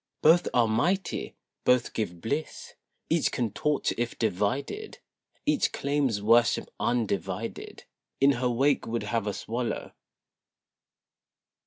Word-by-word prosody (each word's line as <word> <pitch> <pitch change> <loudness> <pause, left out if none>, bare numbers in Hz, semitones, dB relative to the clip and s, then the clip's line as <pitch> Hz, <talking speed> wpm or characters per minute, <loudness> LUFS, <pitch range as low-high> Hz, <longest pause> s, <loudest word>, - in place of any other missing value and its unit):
Both 165 +3 +6
are 120 -2 +3
mighty; 175 - 0 0.3
Both 125 -1 +3
give 90 -6 -3
bliss; 145 +7 -4 0.3
Each - - +2
can 120 -4 -1
torture 150 +6 0
if 120 0 -2
divided; 115 - -2 0.5
Each 300 -2 +2
claims 140 -7 0
worship 115 +1 +3
undivided, 110 -7 -2 0.4
In 140 +1 +6
her 125 - +2
wake 135 +3 +2
would 115 +1 -2
have 115 -3 -1
us 105 - -4
wallow. 120 +1 -3
120 Hz, 115 wpm, -28 LUFS, 110-140 Hz, 0.5 s, Both